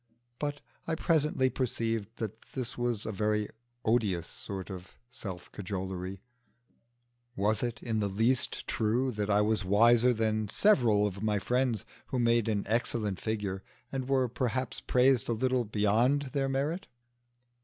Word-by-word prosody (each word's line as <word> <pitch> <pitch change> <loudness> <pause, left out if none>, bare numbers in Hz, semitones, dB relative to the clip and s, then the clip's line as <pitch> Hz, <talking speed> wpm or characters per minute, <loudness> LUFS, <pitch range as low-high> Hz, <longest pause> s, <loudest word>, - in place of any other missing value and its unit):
But 145 -1 -3 0.3
I 165 - 0
presently 150 -5 +2
perceived 115 -4 -2
that 110 0 -5
this 125 -2 -4
was 120 -3 -1
a - - -2
very 105 +1 0 0.4
odious 105 -7 +2
sort 95 0 -6
of 90 -1 -9
self 95 -7 -7
cajolery. 95 -1 -5 1.1
Was 105 +2 +1
it 120 -1 -3
in 115 -2 -1
the 105 - +1
least 115 +6 +1
true 120 +4 +1
that 105 -2 -2
I 105 0 +4
was 105 0 +1
wiser 115 +5 +5
than 110 -2 0
several 115 - +4
of 100 -1 -3
my 105 -1 +1
friends 125 +2 0 0.2
who 130 - -2
made 115 -2 +3
an 105 -2 0
excellent 110 -3 -1
figure, 105 -3 -2 0.3
and 135 -1 -3
were 130 -2 +3
perhaps 125 0 -2
praised 125 -2 +3
a - - +2
little 125 +1 +1
beyond 115 +7 +2
their 135 -1 +1
merit? 150 +8 -1
115 Hz, 145 wpm, -30 LUFS, 105-125 Hz, 1.1 s, wiser